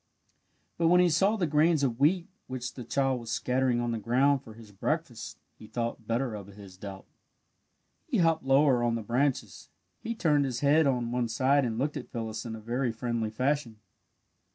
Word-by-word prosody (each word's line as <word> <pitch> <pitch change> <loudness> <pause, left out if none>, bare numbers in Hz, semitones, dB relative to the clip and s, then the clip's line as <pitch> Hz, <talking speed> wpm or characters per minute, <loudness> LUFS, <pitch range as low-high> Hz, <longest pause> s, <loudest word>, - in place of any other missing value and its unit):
But 165 - +3
when 180 +2 +5
he 180 -1 +4
saw 195 +7 +3
the 190 -5 0
grains 155 0 +3
of 125 -3 0
wheat 170 +5 +3 0.2
which 130 0 -5
the 125 - -7
child 135 +1 0
was 115 -1 -9
scattering 125 +2 +1
on 120 0 -1
the 115 - -2
ground 130 +5 +2
for 110 -5 -13
his 110 -2 -14
breakfast, 120 - -3 0.2
he 110 - -12
thought 115 0 -4
better 120 +1 -1
of 100 -3 -7
his 100 -2 -13
doubt. 95 0 -9 1.0
He 275 -7 0
hopped 165 -3 +2
lower 135 -1 +4
on 120 -1 +1
the 115 - -4
branches. 125 +5 -1 0.3
He 230 - -4
turned 150 -8 +2
his 130 0 -3
little 140 +1 +5
head 160 -2 +4
on 120 -3 0
one 120 -1 0
side 135 +5 +2
and 115 -2 -2
looked 145 +4 -1
at 130 - -8
Phyllis 110 -1 -5
in 110 - -5
a - - -8
very 120 +3 -1
friendly 115 -1 -2
fashion. 125 0 -1
125 Hz, 200 wpm, -29 LUFS, 115-145 Hz, 1.0 s, when